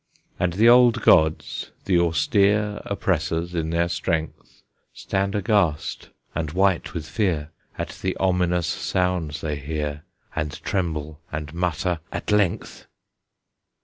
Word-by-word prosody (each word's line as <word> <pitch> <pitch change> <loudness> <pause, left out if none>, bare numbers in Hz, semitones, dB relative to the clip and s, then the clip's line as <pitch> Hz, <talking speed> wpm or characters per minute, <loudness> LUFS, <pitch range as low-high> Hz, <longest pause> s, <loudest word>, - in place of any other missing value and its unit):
And 90 -1 +1
the 110 +6 +4
old 120 -2 +6
gods, 80 0 +3 0.2
the 90 -3 +3
austere 100 +6 +2
Oppressors 85 -3 -1
in 80 -2 -1
their 85 +1 +1
strength, 80 -2 -3 0.3
Stand 100 +1 -1
aghast 100 -7 0 0.2
and 80 -2 -2
white 95 -1 +1
with 80 -3 -3
fear 85 -9 -1 0.3
At - - -3
the 95 0 -1
ominous 90 -2 +1
sounds 90 -4 -1
they 75 -2 -2
hear, 75 0 -4 0.3
And 75 -2 -3
tremble, 80 -5 -2
and 75 -1 -5
mutter, 90 0 -1
"At - - -4
length!" 105 -4 0
85 Hz, 120 wpm, -24 LUFS, 80-95 Hz, 0.3 s, old